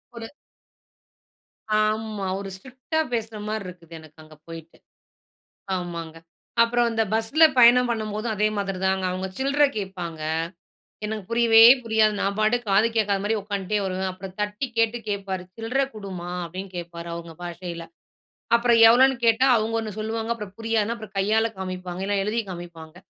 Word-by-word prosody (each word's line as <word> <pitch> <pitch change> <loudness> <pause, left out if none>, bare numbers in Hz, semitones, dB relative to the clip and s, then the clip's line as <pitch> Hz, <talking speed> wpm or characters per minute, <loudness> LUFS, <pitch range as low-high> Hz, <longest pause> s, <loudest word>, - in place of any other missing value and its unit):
ஒரு 230 -1 -7 1.6
ஆமா, 215 -2 -2
ஒரு 200 - -6
ஸ்ட்ரிக்ட்டா 260 +8 -4
பேசுற 225 -2 -3
மாரி 215 -2 -3
இருக்குது 170 -2 -11
எனக்கு 155 0 -16
அங்க 155 0 -16
போய்ட்டு. 165 0 -11 1.0
ஆமாங்க, 170 -3 -5 0.5
அப்புறம் 240 +1 +2
இந்த 225 0 +1
பஸ்ல 225 +9 +2 0.2
பயணம் 245 +1 +7
பண்ணும்போதும் 215 0 -2
அதே 210 +1 +2
மாதிரிதாங்க. 190 -1 -1
அவுங்க 185 +1 -3
சில்ற 275 +2 +2
கேட்பாங்க, 180 -5 -5 0.9
எனக்கு 210 -2 -4
புரியவே 230 -1 +6 0.2
புரியாது. 220 -1 +3
நான் 200 0 -1
பாட்டுக்கு 220 +1 +1
காது 210 +4 +4
கேக்காத 205 -3 +1
மாரி 220 +2 +1
உக்காந்ட்டே 200 0 -2
வருவேன். 190 0 -2
அப்புறம் 185 0 -10
தட்டி 210 +6 -2
கேட்டு 230 +1 +2
கேட்பாரு, 195 -2 -3
"சில்றை 240 +5 0
குடும்மா" 190 -4 -7 0.2
அப்டின்னு 185 +2 -8
கேப்பாரு 170 0 -7
அவுங்க 170 -1 -8
பாஷையில. 170 -1 -6 0.7
அப்புறம் 235 0 +3
எவ்வளோன்னு 260 +3 +5
கேட்டா 230 +3 +4
அவுங்க 220 +1 -1
ஒண்ணு 215 -1 -5
சொல்லுவாங்க. 225 +1 -2
அப்புறம் 210 -4 -9
புரியாதுனா 225 0 0
அப்புறம் 215 -3 -11
கையால 215 +3 +2
காமிப்பாங்க 185 -1 -5
இல்லனா 200 -1 0
எழுதி 215 +3 0
காமிப்பாங்க, 170 -2 -9
210 Hz, 145 wpm, -24 LUFS, 185-225 Hz, 1.6 s, பயணம்